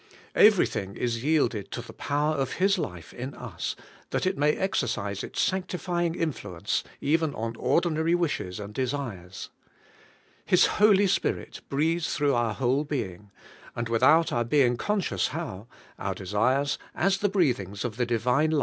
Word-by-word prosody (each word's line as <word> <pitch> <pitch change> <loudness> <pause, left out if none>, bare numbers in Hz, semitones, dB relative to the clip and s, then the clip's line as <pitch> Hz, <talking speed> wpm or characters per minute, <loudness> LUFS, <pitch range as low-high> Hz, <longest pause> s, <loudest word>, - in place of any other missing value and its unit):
Everything 140 - +4
is 115 -1 -2
yielded 125 -10 +1
to - - -5
the - - -11
power 150 +2 0
of 135 -3 -1
His 195 +1 +2
life 90 - -6
in 130 +3 -6
us, 115 -9 -5 0.3
that - - -1
it 185 - +1
may 150 +2 +3
exercise 115 - -1
its - - -6
sanctifying 180 -2 0
influence 105 - -2 0.2
even 155 +1 +1
on 115 +1 -3
ordinary 160 +6 +1
wishes 145 - -2
and 105 0 -7
desires. 120 -9 -4 0.9
His - - +5 0.2
Holy 205 -1 +6
Spirit 190 - -1
breathes 160 +4 0
through 145 -1 +2
our 120 -3 +1
whole 135 +2 +1
being; 105 -10 -4 0.5
and 120 -1 -3
without 145 +8 +4
our 120 - +1
being 125 0 +3
conscious 175 - 0
how, 95 +5 -6 0.3
our - - -2
desires, 125 +9 +1 0.2
as 195 +2 +2
the 205 - +1
breathings 120 - 0
of 115 -2 -4
the 125 - +1
Divine 125 +6 +2
life. 155 -2 +2
135 Hz, 150 wpm, -27 LUFS, 115-165 Hz, 0.9 s, Holy